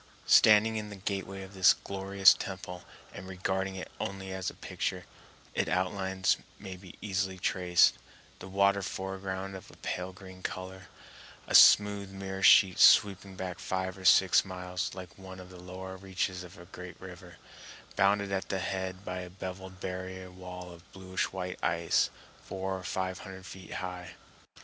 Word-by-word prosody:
Standing 110 +1 +6
in 105 -1 -4
the 105 - -8
gateway 95 0 -4
of 95 +1 -12
this 95 -2 +6
glorious 95 0 +4
temple, 90 -2 -7 0.3
and 95 - -9
regarding 95 +1 -2
it 95 - -7
only 95 -1 -4
as 95 -1 -2
a - - -12
picture, - - -4 0.5
its - - 0
outlines 95 0 +1 0.2
may 95 -2 -8
be 90 -1 -13
easily 95 -2 -1
traced, 90 -2 +3 0.4
the 95 - -9
water 100 +1 +2
foreground 95 0 -4
of 95 - -10
a - - -16
pale 90 +1 -4
green 95 0 -13
color, 95 0 -6 0.6
a - - -6
smooth 100 -1 +7
mirror 95 0 -6
sheet 95 -1 +7
sweeping 100 -1 +5
back 95 0 -5
five 95 -1 -3
or 95 - -12
six 95 0 +6
miles 90 -1 -4
like 90 -1 -9
one 95 -1 -10
of 90 0 -11
the 90 -1 -12
lower 95 +1 -8
reaches 95 -1 -3
of 90 +2 -13
a 85 - -12
great 90 +1 -10
river, 90 -2 -11 0.6
bounded 100 0 +2
at 95 -4 -2
the 95 - 0
head 95 0 -4
by 90 0 -4
a 90 0 -7
beveled 95 0 -8
barrier 95 0 -6
wall 90 0 -9
of 85 0 -16
blueish 95 -1 -3
white 90 -1 -5
ice 85 -1 +2 0.3
four 95 0 -4
or 95 - -7
five 95 0 -3
hundred 95 -2 -10
feet 95 -1 -10
high. 90 -1 -6
95 Hz, 165 wpm, -30 LUFS, 90-95 Hz, 0.6 s, smooth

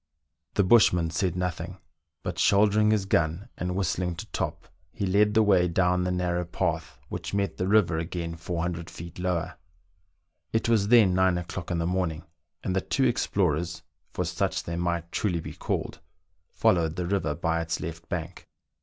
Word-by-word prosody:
The 100 - +4
bushman 90 -5 +5
said 90 0 0
nothing, 90 0 -3 0.5
but - - -4
shouldering 105 +1 +4
his 105 -3 +2
gun, 85 +1 0
and 90 0 -3
whistling 90 -2 -1
to 85 - -7
Top, - - -3 0.2
he 100 - -3
led 105 +3 +3
the 110 - +6
way 95 -4 +4
down 90 +1 +2
the 90 - 0
narrow 90 -1 0
path 85 - -2
which - - -4
met 100 -4 -1
the 95 - -1
river 95 -6 +3
again 85 0 -4
400 85 0 -3
feet 85 +1 -9
lower. 90 -2 -2 0.9
It 110 +1 +1
was 110 -4 +3
then 110 -5 +6
nine 95 -1 +3
o'clock 90 0 -5
in 90 - 0
the 85 - 0
morning, 90 -3 -1 0.4
and 95 - -1
the 95 - +2
two 135 - 0
explorers 90 - 0 0.3
(for - - -2
such - - -1
they 85 - -4
might 85 -1 -2
truly 90 -5 0
be - - -7
called) - - -3 0.5
followed 80 -3 +2
the 90 -1 -2
river 85 -5 0
by 80 +1 0
its 80 -1 -2
left 80 +1 -7
bank. 85 0 -5
90 Hz, 170 wpm, -27 LUFS, 85-95 Hz, 0.9 s, the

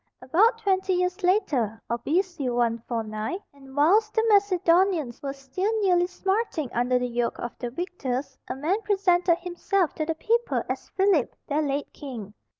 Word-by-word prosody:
About 390 - +3
twenty 385 -3 +1
years 360 +2 0
later, 280 - +1
or 235 - -2
B.C. 340 -2 -1
149, 230 0 -1 0.2
and 270 -1 -15
whilst 405 +9 +3
the 445 0 +3
Macedonians 365 - +3
were 275 - -3
still 275 +10 -3
newly 355 -2 +3
smarting 380 - -1
under 245 +1 +2
the 250 - -1
yoke 240 -1 -1
of 240 - -5
the 245 - -3
victors, 270 -3 -4
a - - -3
man 335 +11 0
presented 365 -5 +2
himself 355 0 -1
to 310 - -2
the 325 - -1
people 465 +8 0
as - - -4
Philip, 380 -8 +2
their 295 +2 0
late 285 -1 -2
king. 230 -8 -8
325 Hz, 155 wpm, -26 LUFS, 255-380 Hz, 0.2 s, About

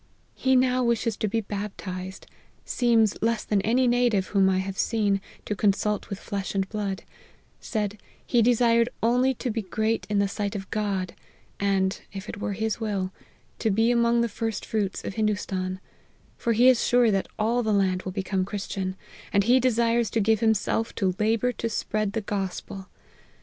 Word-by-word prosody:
He 260 0 +2
now 255 0 +3
wishes 235 -2 +1
to 215 - -1
be 225 +2 0
baptized; 190 -2 -6 0.4
seems 230 -4 +3
less 230 -1 +1
than 205 -2 +1
any 245 +5 +2
native 240 -5 +2
whom 195 -2 +3
I 190 - +2
have 190 0 -3
seen, 205 -4 +1 0.2
to 210 - -2
consult 205 +1 0
with 200 - -4
flesh 200 -2 -4
and 195 -1 0
blood; 205 -3 -3 0.6
said 210 -2 -3 0.3
he 240 - +3
desired 235 0 +4
only 250 +3 +3
to 245 - -3
be 225 +1 -2
great 220 +3 -1
in 210 - +1
the 200 0 +3
sight 200 0 -3
of 195 -1 -5
God, 195 -4 -1 0.5
and, 195 -1 +1
if 195 +1 -7
it 215 - -6
were 205 - -1
his 220 +2 -2
will, 200 -4 -2 0.5
to 220 - +1
be 225 +4 +3
among 235 0 +3
the 235 - +2
first 225 0 -3
fruits 205 -3 -2
of - - -3
Hindoostan; 190 -3 -1 0.6
for 235 - 0
he 240 +3 +5
is 255 -2 +5
sure 245 -2 +4
that 195 -1 0
all 230 +3 +1
the 220 -2 0
land 190 -3 +2
will 185 - -5
become 190 0 -1
Christian, 190 -1 -4 0.4
and 200 - +3
he 245 +5 +5
desires 235 -2 +2
to 225 - 0
give 220 +1 +3
himself 225 0 +1
to 190 -3 +1
labour 225 +3 +2
to 230 -1 -3
spread 215 -1 -1
the 225 - -1
Gospel. 195 -1 -4
215 Hz, 180 wpm, -26 LUFS, 195-230 Hz, 0.6 s, he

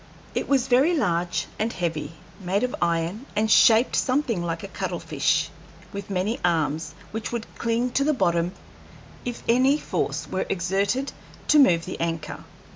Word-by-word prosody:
It - - -2
was 270 -3 +3
very 275 +7 +4
large 175 - 0
and 220 +2 0
heavy, 165 -5 -3 0.3
made 195 +3 0
of 250 - -1
iron, 170 +8 -1
and 215 +1 +1
shaped 230 +3 +6
something 255 -7 +1
like 165 0 -3
a - - -4
cuttlefish, - - -1 0.4
with 200 0 -6
many 200 +6 -1
arms 160 -2 0 0.2
which 220 0 -4
would 235 -2 -3
cling 235 +2 0
to 275 - +1
the 305 - +3
bottom 170 - +1 0.7
if 245 -1 -5
any 260 +5 +4
force - - -2
were 190 - -2
exerted 195 +9 0 0.4
to 300 - +7
move 170 -12 +5
the 180 - -6
anchor. 165 -2 -3
200 Hz, 155 wpm, -25 LUFS, 170-245 Hz, 0.7 s, to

